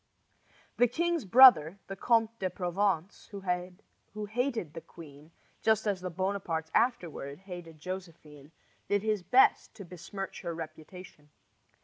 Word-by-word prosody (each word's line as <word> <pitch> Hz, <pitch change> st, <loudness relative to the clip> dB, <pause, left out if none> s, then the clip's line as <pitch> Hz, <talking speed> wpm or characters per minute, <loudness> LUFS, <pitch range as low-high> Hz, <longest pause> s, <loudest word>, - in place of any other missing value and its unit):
The 245 Hz, -, +5 dB
king's 340 Hz, +2 st, -1 dB
brother, 200 Hz, -, +7 dB
the 195 Hz, -, -7 dB
Comte 230 Hz, +2 st, +1 dB
de 185 Hz, -, -1 dB
Provence, 180 Hz, 0 st, -2 dB
who 190 Hz, +2 st, -6 dB
hated 225 Hz, -, -2 dB
the 165 Hz, -, -7 dB
queen, 155 Hz, -2 st, -14 dB, 0.3 s
just 220 Hz, -1 st, +2 dB
as 200 Hz, -3 st, -1 dB
the 185 Hz, -, -4 dB
Bonapartes 175 Hz, -3 st, -3 dB
afterward 170 Hz, -, -1 dB
hated 175 Hz, -4 st, -10 dB
Josephine, 160 Hz, -5 st, -9 dB, 0.4 s
did 205 Hz, 0 st, 0 dB
his 215 Hz, -2 st, 0 dB
best 250 Hz, +8 st, +3 dB
to 200 Hz, -, -10 dB
besmirch 185 Hz, +3 st, -8 dB
her 170 Hz, -2 st, -5 dB
reputation. 155 Hz, -1 st, -11 dB
185 Hz, 125 wpm, -30 LUFS, 165-210 Hz, 0.4 s, brother